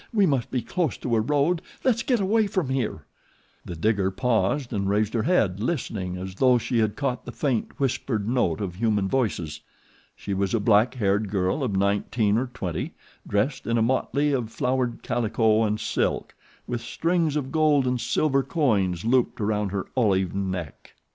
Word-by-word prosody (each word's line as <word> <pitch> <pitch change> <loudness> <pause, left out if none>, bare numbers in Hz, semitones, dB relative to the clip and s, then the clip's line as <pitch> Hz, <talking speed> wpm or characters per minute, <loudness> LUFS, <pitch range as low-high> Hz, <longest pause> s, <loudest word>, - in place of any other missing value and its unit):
We 210 -4 +3
must 135 -8 0
be 125 -2 -2
close 175 -7 -1
to 120 -2 -1
a 110 - +3
road. 150 +7 +1 0.2
Let's 235 -3 +2
get 240 0 +1
away 210 +2 +2
from 185 -9 -1
here." 120 - -2 0.6
The 90 - -6
digger 100 +2 +1
paused 120 +4 0
and 100 -2 -1
raised 105 +1 +1
her 115 - +1
head, 110 - +2
listening, 105 - -2
as 95 +1 -6
though 125 +5 +4
she 120 0 -1
had 110 -1 +1
caught 135 -3 -2
the - - -7
faint, 130 -7 -2
whispered 120 -5 -1
note 110 -8 +1
of 95 -4 -3
human 105 0 0
voices. 95 - -1 0.5
She 100 - -5
was 95 +2 0
a - - +2
black 105 +4 +3
haired 100 -2 +1
girl 95 +7 0
of 110 -7 -1
nineteen 100 +2 +1
or 130 - -2
twenty, 95 -9 -4 0.3
dressed 125 +7 -1
in 115 0 +1
a 115 - +3
motley 140 +4 +1
of 125 -5 -1
flowered 125 0 -1
calico 110 -2 +2
and 105 -1 0
silk, - - -1 0.3
with 120 -1 -3
strings 165 -1 0
of 140 -3 -2
gold 155 -4 +3
and 125 -1 0
silver 140 -3 +1
coins 105 - 0
looped 125 +1 +2
around 105 -1 0
her 95 0 -3
olive 95 -7 +2
neck. 95 -6 -5
115 Hz, 180 wpm, -25 LUFS, 100-135 Hz, 0.6 s, though